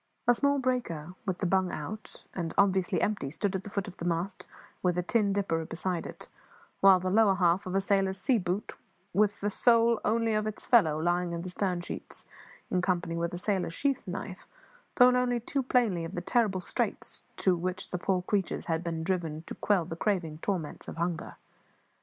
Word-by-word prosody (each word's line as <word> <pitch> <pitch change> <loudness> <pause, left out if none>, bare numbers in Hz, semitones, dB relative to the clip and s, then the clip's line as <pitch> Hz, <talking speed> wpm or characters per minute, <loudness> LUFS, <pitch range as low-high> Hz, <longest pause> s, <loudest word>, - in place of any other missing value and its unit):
A 245 - +7
small 280 +3 +2
breaker, 240 - -2
with 185 -2 0
the 190 - -2
bung 185 0 +2
out, 215 +9 -7
and 165 -3 -4
obviously 190 -2 +3
empty, 205 -10 -1
stood 190 +6 -2
at 190 - -3
the 205 - -8
foot 200 0 -3
of 185 - -10
the 170 - -5
mast, 175 +3 -2 0.3
with 180 -1 +1
a 180 - +1
tin 205 +1 +2
dipper 195 -5 0
beside 170 +2 -3
it; - - -10 0.5
while 195 -1 +7
the 185 0 -2
lower 210 -1 +5
half 180 +1 +2
of 185 - -3
a 195 - +3
sailor's 195 -1 +1
sea 240 +3 +2
boot, 185 +2 -3 0.4
with 205 +2 +2
the 205 +1 0
sole 230 +1 +4
only 230 0 +1
of 215 0 0
its 215 - -5
fellow, 160 -11 +4
lying 175 +1 0
in 170 0 -4
the 185 - -5
stern 180 -1 -1
sheets, - - -7 0.5
in 180 - +2
company 175 -2 0
with 170 +1 -1
a 175 - -4
sailor's 180 -3 -1
sheath 275 -6 -1
knife, 185 +1 -6 0.5
told 250 0 +7
only 250 -1 +2
too 270 +4 -2
plainly 235 -9 +1
of 165 - -6
the 175 - -2
terrible 195 -1 +1
straits - - -3
to 185 -2 +3
which 185 +2 -3
the 180 - -2
poor 185 0 0
creatures 195 -1 -1
had 165 0 -1
been 165 -2 -3
driven 165 -3 -2
to - - -7
quell 200 -5 +1
the 165 - -6
craving 170 -5 -1
torments 170 -5 -3
of - - -7
hunger. 170 -1 -3
185 Hz, 200 wpm, -29 LUFS, 175-210 Hz, 0.5 s, A